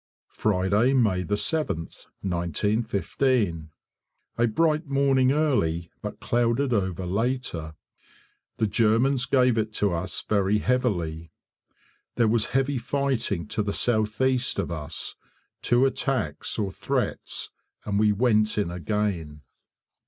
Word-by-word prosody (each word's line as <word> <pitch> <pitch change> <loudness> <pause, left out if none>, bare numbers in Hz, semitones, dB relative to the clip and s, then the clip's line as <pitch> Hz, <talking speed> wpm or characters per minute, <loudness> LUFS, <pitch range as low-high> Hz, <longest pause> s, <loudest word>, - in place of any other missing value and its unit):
Friday, 105 +5 +2
May 105 -8 +2
7th, 105 - -2 0.2
1915. 100 - 0 0.7
A 120 - +4
bright 155 +6 +1
morning 135 -2 +3
early, 85 - 0
but - - -6
clouded 120 +2 +1
over 95 -4 -1
later. 95 -6 -2 0.8
The 110 - +1
Germans 115 +5 +2
gave 125 -3 +3
it 110 0 -1
to 100 -3 +1
us 85 +3 -3
very 100 0 +2
heavily. 85 -10 -1 0.8
There 115 -2 +3
was 110 0 +2
heavy 135 0 0
fighting 125 - -1
to - - -1
the 100 -1 -2
south 110 -3 +1
east 130 -1 +2
of - - -2
us. 80 -1 -4 0.5
Two 120 +2 +3
attacks 130 - -1
or 100 -2 -1
threats, - - -2 0.3
and 100 -1 0
we 105 0 +4
went 110 -1 +2
in 100 -5 0
again. 90 -5 -2
110 Hz, 115 wpm, -26 LUFS, 90-130 Hz, 0.8 s, A